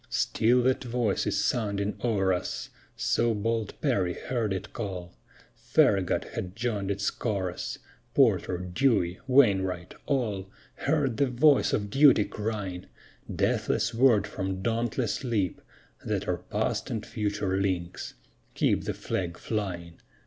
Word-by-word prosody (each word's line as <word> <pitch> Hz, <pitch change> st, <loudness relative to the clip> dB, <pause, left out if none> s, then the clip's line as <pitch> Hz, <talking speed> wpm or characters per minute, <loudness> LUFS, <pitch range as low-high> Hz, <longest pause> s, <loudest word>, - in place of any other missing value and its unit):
_ -, -, -36 dB
Still 120 Hz, +2 st, +2 dB
that 130 Hz, +1 st, +2 dB
voice 120 Hz, -4 st, 0 dB
is -, -, +1 dB
sounding 100 Hz, -3 st, 0 dB
o'er 100 Hz, -6 st, +2 dB
us, 90 Hz, -, -4 dB, 0.2 s
So 115 Hz, -1 st, +1 dB
bold 110 Hz, 0 st, -2 dB
Perry 100 Hz, -, +1 dB
heard 115 Hz, -5 st, -2 dB
it 95 Hz, -, -4 dB
call; 90 Hz, -5 st, -5 dB, 0.4 s
Farragut 95 Hz, -3 st, +2 dB
has -, -, -2 dB
joined 110 Hz, -4 st, -2 dB
its 100 Hz, 0 st, 0 dB
chorus; 95 Hz, -6 st, -3 dB, 0.4 s
Porter, 90 Hz, -, +3 dB
Dewey, 90 Hz, 0 st, +1 dB
Wainwright 95 Hz, -9 st, +3 dB
all 105 Hz, -9 st, -1 dB, 0.4 s
Heard 140 Hz, -5 st, +1 dB
the 140 Hz, -, +3 dB
voice 135 Hz, +3 st, +4 dB
of 100 Hz, -1 st, -1 dB
duty 135 Hz, -6 st, +6 dB
crying; 105 Hz, -4 st, -4 dB, 0.4 s
Deathless 115 Hz, -, 0 dB
word 115 Hz, -4 st, +4 dB
from 95 Hz, -2 st, -4 dB
dauntless 115 Hz, +1 st, -1 dB
lip 110 Hz, -8 st, -1 dB, 0.4 s
That -, -, -2 dB
our -, -, 0 dB
past -, -, -2 dB
and 110 Hz, -1 st, -3 dB
future 105 Hz, -3 st, -1 dB
links: 90 Hz, -2 st, -3 dB, 0.4 s
_Keep -, -, +1 dB
the -, -, -2 dB
Flag 90 Hz, -2 st, -3 dB
flying! 90 Hz, -6 st, -4 dB
105 Hz, 130 wpm, -28 LUFS, 95-120 Hz, 0.4 s, duty